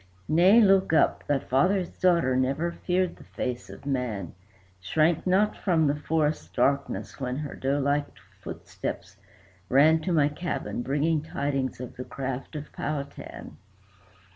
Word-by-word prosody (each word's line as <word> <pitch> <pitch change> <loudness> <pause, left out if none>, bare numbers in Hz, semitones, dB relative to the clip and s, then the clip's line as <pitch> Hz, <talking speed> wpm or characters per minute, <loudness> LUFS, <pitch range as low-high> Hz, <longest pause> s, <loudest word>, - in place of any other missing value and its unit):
"Nay, 185 +8 +6
look 195 -4 +4
up. 155 - +3
Thy 145 - +3
father's 180 +8 +1
daughter 170 -8 +3
never 135 +6 0
feared 180 +1 -1
the - - -14
face 125 -1 -5
of - - -11
man, 125 - -2 0.5
Shrank 155 - +1
not 200 +3 +3
from 165 -5 +1
the 145 0 +2
forest 150 0 -1
darkness 140 +4 0
when 125 -2 -2
her 150 -1 -5
doe 135 +2 -1
like 145 +1 +1 0.3
footsteps - - -6 0.5
ran 155 +5 +5
To 180 - -2
my 150 -4 +4
cabin, 150 -4 -3
bringing 145 +4 +1
tidings 140 -4 -2
of 125 -1 -8
the 125 - -4
craft 135 +2 -5
of 150 0 -6
Powhatan." 145 -1 -6
145 Hz, 140 wpm, -27 LUFS, 135-170 Hz, 0.5 s, Nay